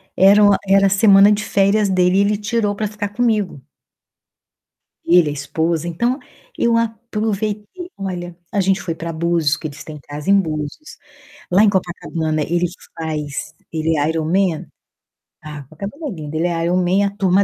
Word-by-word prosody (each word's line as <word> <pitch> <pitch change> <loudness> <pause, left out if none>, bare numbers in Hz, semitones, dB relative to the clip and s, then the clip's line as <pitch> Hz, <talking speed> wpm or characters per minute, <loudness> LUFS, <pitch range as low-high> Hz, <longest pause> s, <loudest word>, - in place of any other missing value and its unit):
era 200 +2 +6
o 205 - +6 0.2
era 195 0 +5
semana 195 +1 +6
de 210 0 +1
férias 200 +1 +2
dele 185 0 +3
e - - +5
ele 205 +1 +1
tirou 210 -1 -1
pra 215 0 -2
ficar 205 -1 -5
comigo 210 - 0 1.5
ele, 170 -2 +5
a - - -3
esposa, 160 +3 -2
então 240 - -1 0.4
eu 235 -1 +2
aproveitei. 220 - -3
Olha, 175 -3 -5 0.2
a 200 - +1
gente 190 0 +1
foi 170 -2 -3
pra 165 0 -5
Búzios, 160 -2 +1
que 155 - -6
eles 145 0 -11
têm 155 -1 -9
casa 145 +6 -5
em 200 0 +6
Búzios. 155 - -5 0.5
Lá 190 +4 +5
em - - +5
Copacabana, 165 -4 -2
ele 175 +3 0 0.3
faz 150 -3 -4 0.2
ele 160 0 0
é 145 +2 +1
Ironman. 165 +2 0 0.8
Ah, 150 -2 -8
Copacabana 200 - -7
é - - -5
lindo, 155 -3 -7
ele 170 +2 +1
é 165 -1 -1
Ironman, 180 +3 +2
a - - -4
turma 195 0 +3
185 Hz, 165 wpm, -19 LUFS, 160-205 Hz, 1.5 s, era